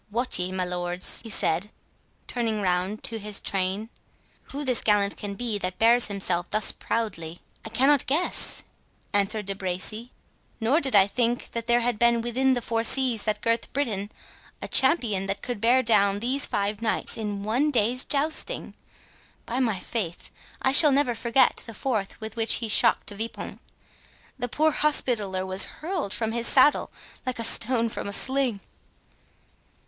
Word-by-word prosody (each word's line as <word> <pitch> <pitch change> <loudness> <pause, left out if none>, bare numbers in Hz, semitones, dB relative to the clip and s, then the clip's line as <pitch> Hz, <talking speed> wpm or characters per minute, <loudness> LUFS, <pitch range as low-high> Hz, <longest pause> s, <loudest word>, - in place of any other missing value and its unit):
—Wot 240 +2 0
ye, 180 +1 -2
my 185 -1 -2
lords," 180 0 -1
he 230 - -10
said, 195 -1 0 0.6
turning 230 -3 -2
round 185 +2 -1
to 225 -1 -2
his 210 -1 -2
train, 195 +3 -2 0.6
"who 285 +1 -7
this 255 -2 +1
gallant 205 -2 +2
can 200 -1 -7
be, 230 -2 -3
that 185 -1 -4
bears 235 +2 +4
himself 185 -4 -2
thus 215 -1 +3
proudly?" 175 -8 -4 0.2
"I - - -8
cannot 270 +5 +2
guess," 315 +7 +2 0.5
answered 205 +1 0
De 195 - -3
Bracy, 195 +5 -4 0.5
"nor 255 +8 +1
did 265 -5 0
I 195 -1 +7
think 240 +3 -2
there 235 +1 0
had 235 -2 -1
been 235 -1 +3
within 255 +3 +1
the 245 - -3
four 230 0 -1
seas 250 -2 +1
that 210 -1 -1
girth 230 0 0
Britain 215 -7 -3 0.5
a - - -7
champion 235 - +4
that 195 +1 -4
could 245 -5 -5
bear 250 +3 +4
down 200 -4 +3
these 255 +6 0
five 205 +1 -2
knights 225 -1 -2
in 205 -2 -5
one 245 +8 0
day's 245 -1 +1
jousting. 310 - -1 0.7
By 245 +3 -3
my 225 -6 0
faith, 180 -4 -5 0.3
I 265 - +3
shall 295 +2 +9
never 275 -3 +1
forget 235 +3 +1
the 230 - -9
force 215 -5 -3
with 220 0 -8
which 225 -1 +1
he 230 - -3
shocked 210 - +4
De 205 - -8
Vipont. 225 +3 -6 0.8
The 245 - -3
poor 310 +6 +1
Hospitaller 215 -11 0
was 190 +1 +3
hurled 330 - -5
from 225 0 -2
his 235 0 -1
saddle 275 +2 +3 0.3
like 255 -1 -4
a 230 - -4
stone 230 +1 +2
from 220 - -6
a 200 - -4
sling." 260 -4 +1
225 Hz, 165 wpm, -25 LUFS, 200-250 Hz, 0.8 s, shall